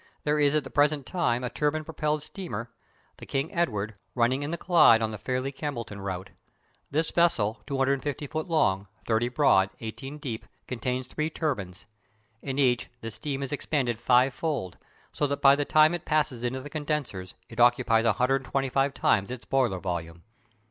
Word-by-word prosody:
There 150 0 +1
is 145 0 +3
at 155 - +2
the - - -10
present 145 -1 +2
time 125 -9 0
a 125 - -1
turbine 155 +1 0
propelled 150 -1 -2
steamer, 120 - -6 0.5
the - - -11
King 135 +3 -2
Edward, 110 -11 -1 0.2
running 125 +3 +2
in 145 - -3
the 170 - -2
Clyde 170 -11 +6
on 110 -1 -1
the 105 - -6
Fairlie 130 +3 -2
Campbelltown 125 -8 -5
route. 95 -1 -5 0.6
This 160 +3 0
vessel, 145 -12 +2
250 140 +1 0
feet 155 +2 -4
long, 100 - +1 0.2
30 115 +1 +1
broad, 125 -8 +4
18 135 +6 -6
deep, 120 -7 -6 0.2
contains 125 +1 -2
three 155 +4 -2
turbines. 105 - -3 0.6
In 135 -1 -4
each 125 -6 +2
the 115 - -5
steam 135 +6 -4
is 135 - -4
expanded 135 -5 -1
fivefold, 125 - +1 0.3
so 145 - 0
that 140 0 -2
by 140 0 +7
the 145 0 -1
time 155 +2 +5
it 175 - -3
passes 150 -6 0
into 130 +2 -2
the 145 - -8
condensers 145 - -3
it - - -10
occupies 120 -1 +4
125 135 +3 +1
times 100 -2 +2
its 125 -1 -7
boiler 125 -8 +1
volume. 85 -2 -4
135 Hz, 170 wpm, -27 LUFS, 115-150 Hz, 0.6 s, by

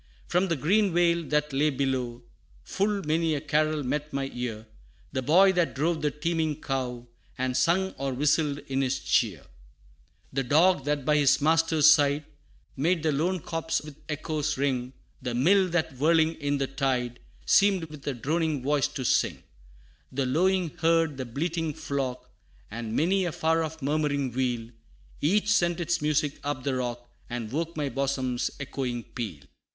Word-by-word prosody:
From 180 +2 +1
the 170 - 0
green 185 +6 +2
vale 170 -1 +3
that 150 -1 0
lay 145 +3 +3
below. 130 -3 -2 0.4
Full 200 0 -1
many 160 +1 +1
a - - -1
carol 155 +1 0
met 150 +3 -2
my 135 0 -3
ear; 115 -3 -4 0.5
The 130 - -1
boy 180 +9 +5
that 175 -3 0
drove 160 +3 0
the 150 - +2
teeming 160 0 -1
cow. 125 -4 -3 0.3
And 130 0 -1
sung 175 +8 +2
or 135 -1 -1
whistled 145 +2 +1
in 135 0 0
his 135 0 0
cheer; - - 0 0.9
The 135 - +1
dog 150 +3 +3
that 145 -2 -1
by 150 +1 +3
his 145 -1 +4
master's 160 0 +3
side, 145 -1 +5 0.5
Made 160 +4 +1
the 155 - +2
lone 170 +5 0
copse 165 0 -2
with 150 -1 -10
echoes 150 -1 -2
ring: 130 -2 -1 0.3
The 125 -2 -3
mill 185 +9 +4
that 165 -5 -1
whirling 160 +3 +3
in 145 0 0
the 135 - 0
tide, 130 -3 -1 0.3
Seemed 195 -3 +4
with 150 -3 -10
a 140 - -1
droning 155 +2 -1
voice 145 0 +2
to 130 - -6
sing; - - +1 0.7
The 135 +1 -1
lowing 175 +5 +1
herd, 165 -3 +2
the 130 - -4
bleating 160 +5 -2
flock, 130 -3 -3 0.4
And 115 0 -5
many 185 +4 +2
a 175 - -1
far 165 0 +1
off 160 -2 -6
murmuring 145 -2 0
wheel: 120 -2 -2 0.5
Each 205 +7 +2
sent 175 -4 +2
its 170 -1 0
music 150 -1 0
up 145 -3 -3
the 140 -1 0
rock, 120 -1 -3 0.2
And 120 -3 -4
woke 165 +3 -3
my 145 -2 -1
bosom's 130 -1 -1
echoing 130 -4 -3
peal. 105 - -6
150 Hz, 165 wpm, -27 LUFS, 130-165 Hz, 0.9 s, boy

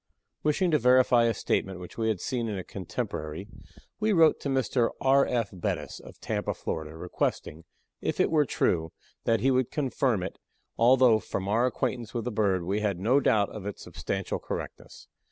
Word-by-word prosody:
Wishing 170 +4 +1
to 150 - +4
verify 125 -1 +5
a 115 - +2
statement 95 -1 -1
which 90 - -10
we 110 -1 -1
had 110 -4 0
seen 120 +1 -2
in 105 -3 -3
a 95 - -4
contemporary, 85 -2 -5 0.5
we 215 0 +1
wrote 165 -5 +5
to 140 - -4
Mr. 130 -3 +1
R. 135 +1 +4
F. 115 -4 -1
Bettis, 90 - -3
of - - -14
Tampa, - - -2
Florida, 80 0 -5
requesting, 80 -2 -3 0.4
if - - -2
it - - +3
were 155 -2 +4
true, 80 -8 0 0.3
that 115 -2 +2
he 135 +3 +3
would 130 -2 +1
confirm 130 -7 0
it, 95 - -6 0.4
although, 120 -1 +5
from 95 -2 -4
our 115 +5 +2
acquaintance 120 -2 -3
with 115 -2 -2
the 125 - -2
bird, 100 -4 +1
we 95 +4 -1
had 105 -3 -1
no 120 +8 +3
doubt 105 -6 +2
of 105 -2 -7
its 105 - -6
substantial - - -4
correctness. - - -7
115 Hz, 185 wpm, -28 LUFS, 95-130 Hz, 0.5 s, verify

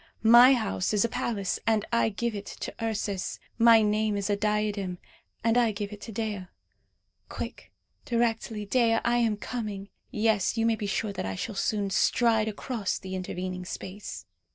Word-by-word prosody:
My 250 +3 +9
house 215 -3 -1
is 210 - +3
a - - -1
palace, 205 -4 -2
and 220 -2 +2
I 235 -1 +3
give 230 +2 -2
it 205 -1 -6
to - - -6
Ursus. 205 -4 -2 0.2
My 230 -1 +7
name 210 0 +1
is 200 +1 -1
a - - +3
diadem, 210 -3 -1 0.5
and 230 +1 +4
I 235 -2 +3
give 205 0 -5
it 205 - -10
to 225 - -7
Dea. 210 -3 -3 0.8
Quick, - - -7 0.3
directly, 225 -2 -1
Dea, 230 +2 +3
I 240 0 +3
am 225 -3 +2
coming; 210 -3 -5 0.2
yes, 215 -1 +1
you 225 - +2
may 230 0 +3
be 210 -2 -4
sure 200 +1 -1
that 180 - -4
I 95 - -3
shall 220 - -4
soon 200 0 -1
stride 225 +1 +3
across 215 -1 -2
the 190 0 -7
intervening 185 0 -4
space!" 185 - -7
210 Hz, 175 wpm, -28 LUFS, 200-225 Hz, 0.8 s, My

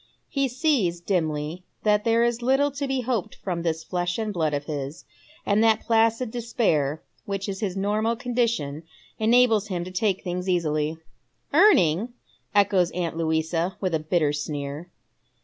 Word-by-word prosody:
He 275 -1 +1
sees, 250 - +1
dimly, 165 -2 -2 0.2
that 210 -1 +2
there 230 0 +3
is 240 0 0
little 270 +4 +2
to 280 0 -3
be 265 -1 0
hoped 240 -6 -2
from 175 -3 -4
this 160 -1 -2
flesh 175 0 -2
and 215 -2 -2
blood 160 -4 0
of 145 0 -2
his, 145 0 -5 0.4
and 205 +2 +3
that 220 -1 +4
placid 225 +1 +2
despair 165 - 0 0.2
which 200 -1 -3
is 195 -1 -4
his 195 -3 -2
normal 215 +4 0
condition 235 - -1 0.4
enables 225 -2 +4
him 180 -4 -3
to 185 - -8
take 190 +1 0
things 180 +1 -3
easily. 155 -3 0 0.6
"Earning!" 240 - +4 0.4
echoes 195 -3 +4
aunt 170 -2 -2
Louisa 165 +2 -1
with 185 -3 -1
a 160 - +2
bitter 155 -1 +1
sneer. 145 +2 -4
190 Hz, 155 wpm, -25 LUFS, 160-230 Hz, 0.6 s, that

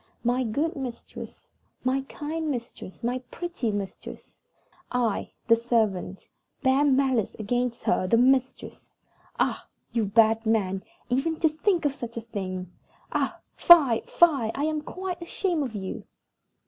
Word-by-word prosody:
My 245 +2 +2
good 285 +8 -1
mistress, 255 -4 -8 0.4
my 260 +1 +1
kind 315 +1 -3
mistress, 235 -5 -6
my 245 +2 0
pretty 345 -10 -3
mistress! 200 -2 -7 0.6
I, 240 -4 -1
the 230 - +7
servant, 220 -5 -1 0.4
bear 265 +2 +4
malice 265 -6 +2
against 240 +2 -1
her, 185 - +1
the 230 - +4
mistress! 260 +1 +1 0.5
Ah! - - 0 0.2
you 230 -3 +1
bad 220 +2 +4
man, 195 -4 0 0.3
even 300 +6 0
to 320 - +5
think 330 +2 0
of 285 - +2
such 235 -4 -7
a - - -2
thing! 185 -5 -5 0.4
Ah! - - -1
fie, 285 -10 +7
fie! 285 -10 +4
I 280 - -2
am 310 0 0
quite 365 +2 -5
ashamed 340 -1 -1
of 235 -4 -6
you!" 190 -2 -5
245 Hz, 135 wpm, -26 LUFS, 220-295 Hz, 0.6 s, the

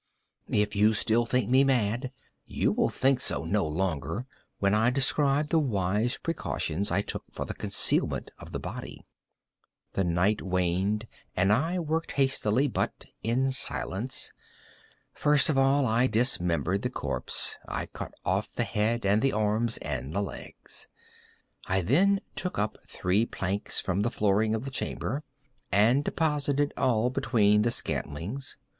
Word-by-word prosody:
If 105 0 +2 0.3
still 115 +2 +2
you - - -2
think 125 -3 +1
me 130 +1 +6
mad, 125 -1 +1 0.4
you - - +1
will - - +1
think 135 -1 +2
so - - +1
no 100 0 +1
longer 90 - -2 0.3
when 100 0 +2
I 110 +3 +4
describe 140 +2 +2
the 165 - +3
wise 105 - 0
precautions 100 - -2
I 100 +3 +1
took - - -4
for - - -5
the - - -5
concealment - - 0
of - - -11
the - - -3
body. - - -7 0.9
The 95 - +1
night 90 +5 +1
waned, 95 +4 0 0.3
and 95 +3 +3
I 160 +10 +1
worked 165 -1 -2
hastily, 135 -2 +2
but 125 - -2 0.2
in 130 +4 +1
silence. 130 -1 -1 0.8
First 150 +1 +3
of 140 - 0
all 135 +1 +4
I 120 +2 +3
dismembered 95 - +1
the 125 - -1
corpse. - - +1
I - - -3
cut - - -8
off - - 0
the - - 0
head 110 +2 0
and 100 +2 +3
the 135 - +2
arms 110 +2 +1
and 70 +1 -4
the 100 - +1
legs. - - -8 0.8
I 95 +1 +1
then 185 - +3
took 180 - -3
up 105 +1 -1
three 100 +6 +1
planks 95 +2 -2
from 95 +1 -1
the 115 - +1
flooring 105 0 +1
of 110 +4 -4
the 135 - -5
chamber, 135 +1 -3 0.5
and 115 +8 +4
deposited 145 -2 0
all 120 -1 +2
between 105 -6 +3
the 115 - +2
scantlings. 105 - -4
110 Hz, 150 wpm, -28 LUFS, 100-135 Hz, 0.9 s, me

